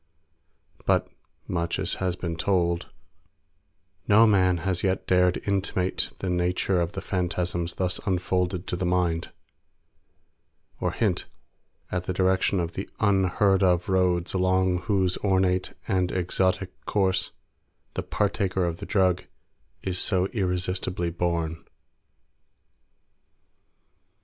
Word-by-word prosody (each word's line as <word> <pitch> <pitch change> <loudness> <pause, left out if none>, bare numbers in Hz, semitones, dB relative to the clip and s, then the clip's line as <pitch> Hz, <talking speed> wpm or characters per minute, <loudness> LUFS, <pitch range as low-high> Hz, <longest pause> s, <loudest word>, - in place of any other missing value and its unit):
But - - +2 0.4
much 85 -1 -1
as - - -1
has 90 -2 0
been 85 -2 -4
told, 85 0 0 1.2
no 110 +2 +7
man 95 -4 +4
has 95 -2 0
yet 95 -1 0
dared 90 0 +3
intimate 95 -2 0
the 95 - -4
nature 90 +1 +1
of 85 0 -2
the 95 - -5
phantasms 90 -2 -1
thus 90 -1 -1
unfolded 90 0 0
to - - -2
the 90 - -3
mind, 90 -2 0 1.5
or - - 0
hint - - 0 0.6
at 90 0 -2
the 95 - -2
direction 95 +1 +2
of 85 -1 -2
the 95 - -5
unheard 95 -1 +3
of 90 -2 +2
roads 90 -2 +1
along 95 -1 +2
whose 95 -3 +2
ornate 95 -2 +1
and 90 -2 +1
exotic 95 +1 -1
course 95 -2 +1 0.6
the - - -2
partaker 95 -3 0
of 85 -1 -2
the - - -8
drug 95 -3 +2 0.6
is 90 -2 -1
so 95 -2 +1
irresistibly 90 -3 -1
borne. 85 -1 -2
90 Hz, 115 wpm, -26 LUFS, 90-95 Hz, 1.5 s, no